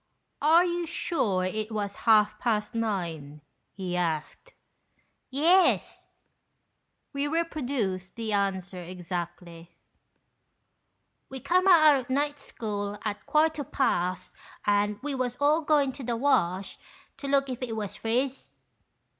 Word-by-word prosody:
"Are 325 +4 +5
you 345 -1 -2
sure 235 - 0
it 215 +4 -3
was 205 -2 -3
half 215 -1 +5
past 220 -1 -1
nine?" 170 -10 -3 0.3
he 185 -2 -4
asked. 170 - -3 0.8
"Yes," 335 +8 +2 1.1
(we 280 +1 -1
reproduce 265 - -2
the 225 0 -4
answer 195 -2 -1
exactly), 175 -1 -7 1.5
"we 265 - -6
come 365 +8 +2
out 305 -8 +6
o' - - -4
night 290 +2 0
school 205 -5 -5
at 210 -1 -4
quarter 310 -1 +2
past, 185 -9 -1 0.3
and 205 0 +1
we 290 -1 -2
was 250 -2 -2
all 295 +3 +3
goin' 290 -3 +2
to 270 +1 -9
the 235 -1 -2
Wash 200 -8 +1 0.4
to 280 - -6
look 275 0 +2
if 255 -1 -5
it 235 -3 -3
was 205 -2 -4
friz." 250 +5 -2
230 Hz, 120 wpm, -27 LUFS, 190-285 Hz, 1.5 s, out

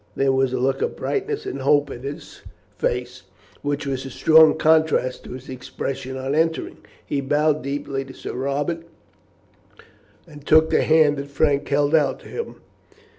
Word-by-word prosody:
There 135 0 +2
was 130 -1 +1
a 130 - -1
look 135 +2 0
of - - -1
brightness 415 +1 -3
and 135 - -5
hope 145 +2 +2
in 120 - -8
his 140 +2 -8 0.3
face, 125 +1 -2 0.4
which 145 0 -2
was 135 -2 -3
a 135 - -7
strong 160 +3 +5
contrast 155 -5 +2
to - - -8
his 130 +1 -10
expression 130 +1 -5
on 135 +1 -3
entering. 160 +1 0 0.3
He 140 - -2
bowed 150 +2 +1
deeply 140 0 -3
to 130 - -11
Sir - - -7
Robert, 140 +6 -2 1.5
and 150 -3 -13
took 160 +1 +4
the - - +3
hand 155 -2 +4
that 140 0 -5
Frank 140 0 +1
held 145 +1 +1
out 155 -3 +2
to - - -14
him. 465 - -5
140 Hz, 170 wpm, -22 LUFS, 135-155 Hz, 1.5 s, strong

